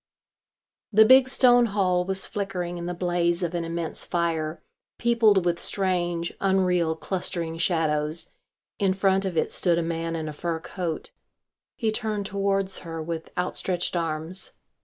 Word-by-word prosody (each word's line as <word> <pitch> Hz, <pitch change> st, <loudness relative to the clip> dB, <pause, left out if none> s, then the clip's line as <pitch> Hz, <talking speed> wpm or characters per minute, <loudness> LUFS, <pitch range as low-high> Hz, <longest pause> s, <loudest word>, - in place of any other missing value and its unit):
The 220 Hz, +1 st, +7 dB
big 260 Hz, +2 st, +7 dB
stone 245 Hz, -2 st, +5 dB
hall 185 Hz, -4 st, +1 dB
was 190 Hz, 0 st, 0 dB
flickering 180 Hz, -4 st, -4 dB
in 170 Hz, -, -5 dB
the 180 Hz, -, -3 dB
blaze 175 Hz, 0 st, 0 dB
of 175 Hz, 0 st, -2 dB
an 170 Hz, -1 st, -1 dB
immense 165 Hz, -1 st, -3 dB
fire, 165 Hz, -2 st, -2 dB, 0.3 s
peopled 225 Hz, -6 st, +3 dB
with 170 Hz, -1 st, +1 dB
strange, 175 Hz, -3 st, -1 dB
unreal, 180 Hz, -4 st, +2 dB
clustering 170 Hz, -2 st, -3 dB
shadows. 160 Hz, -2 st, 0 dB, 0.5 s
In 195 Hz, -2 st, +2 dB
front 195 Hz, 0 st, +2 dB
of 180 Hz, -3 st, -3 dB
it -, -, +1 dB
stood 175 Hz, -2 st, +2 dB
a 170 Hz, -, +1 dB
man 165 Hz, 0 st, -2 dB
in 160 Hz, -1 st, -3 dB
a 155 Hz, -, -5 dB
fur 165 Hz, +2 st, -3 dB
coat. 170 Hz, -1 st, -5 dB, 0.6 s
He 225 Hz, -2 st, 0 dB
turned 215 Hz, -2 st, -2 dB
towards 195 Hz, -1 st, -1 dB
her 165 Hz, -1 st, -7 dB
with 160 Hz, 0 st, -5 dB
outstretched 180 Hz, 0 st, -1 dB
arms. 165 Hz, +2 st, -1 dB
175 Hz, 150 wpm, -25 LUFS, 165-195 Hz, 0.6 s, The